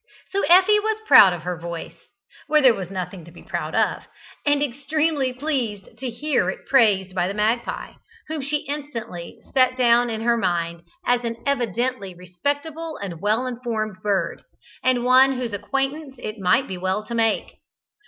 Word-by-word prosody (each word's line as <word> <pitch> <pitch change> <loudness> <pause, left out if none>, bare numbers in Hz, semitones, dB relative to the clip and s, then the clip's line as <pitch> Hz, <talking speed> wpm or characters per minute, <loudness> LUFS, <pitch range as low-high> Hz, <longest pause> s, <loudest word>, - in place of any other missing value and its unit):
So 395 +1 0
Effie 380 +4 +6
was 440 +1 -1
proud 195 - +9
of 175 -2 -5
her 180 -2 -4
voice 170 0 -6 0.5
where 305 +1 +4
there 260 -4 +6
was 190 -5 -6
nothing 185 -1 -5
to - - -13
be 175 - -14
proud - - -4
of - - 0 0.4
and 290 0 +3
extremely 285 +1 0
pleased 250 -8 -3
to 260 -1 -3
hear 285 +6 0
it - - -6
praised 205 -8 +3
by 180 -1 0
the 195 - -4
magpie, 220 +3 -1 0.4
whom 310 -1 -4
she 290 +2 -2
instantly 235 -12 -6 0.2
set 255 -1 +3
down 240 -1 +4
in 220 -1 -3
her 235 +1 +2
mind 170 -4 -1 0.2
as 245 0 +2
an 230 -1 -2
evidently 240 -6 -1
respectable 285 - -4
and 180 -5 -7
well 215 +5 +1
informed 230 -5 -3
bird, 195 -4 -1 0.4
and 255 -2 +2
one 260 +2 +6
whose 250 -4 -4
acquaintance 270 +7 -3
it 215 -2 -6
might 190 +8 +2
be 185 -1 -6
well 190 +3 -1
to 235 - -7
make. 225 -1 0
240 Hz, 170 wpm, -23 LUFS, 195-280 Hz, 0.5 s, proud